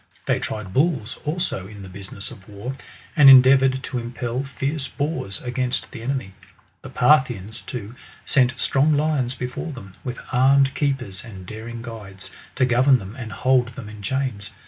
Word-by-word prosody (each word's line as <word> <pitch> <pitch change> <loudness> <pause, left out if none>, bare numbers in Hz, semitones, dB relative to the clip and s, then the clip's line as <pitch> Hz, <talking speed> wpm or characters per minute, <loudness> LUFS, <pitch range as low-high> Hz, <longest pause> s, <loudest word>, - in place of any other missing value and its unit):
They - - +1
tried 105 -4 -5
bulls, 135 - +1
also, 150 - -2
in 100 -1 -10
the - - -9
business 100 +2 -7
of 100 -5 -14
war, 105 +6 -6 0.4
and 145 -4 +9
endea 130 0 +9
voured 130 0 +1
to 130 -2 -3
impel 120 +1 -3
fierce 140 +2 -2
boars 140 - -3
against 125 0 -2
the 120 - -8
enemy. 125 -6 -3 0.5
The - - -9
Parthi 130 -2 +4
ans, 100 +4 -7
too, 115 -2 -7 0.3
sent 130 -3 +2
strong 145 +3 +3
lions 145 -5 0
before 125 +6 -4
them, 100 -9 -10
with 125 -1 -5
armed 135 +2 +4
keepers 135 -10 -2
and 95 -6 -10
daring 115 +3 -7
guides, 105 -5 -9 0.2
to 130 - +3
goyem 130 +2 +5
them 100 0 -9
and 120 -5 -7
hold 125 +3 +2
them 115 -6 -8
in 105 -1 -10
chaiiis. 120 -3 -2
125 Hz, 170 wpm, -23 LUFS, 105-135 Hz, 0.5 s, and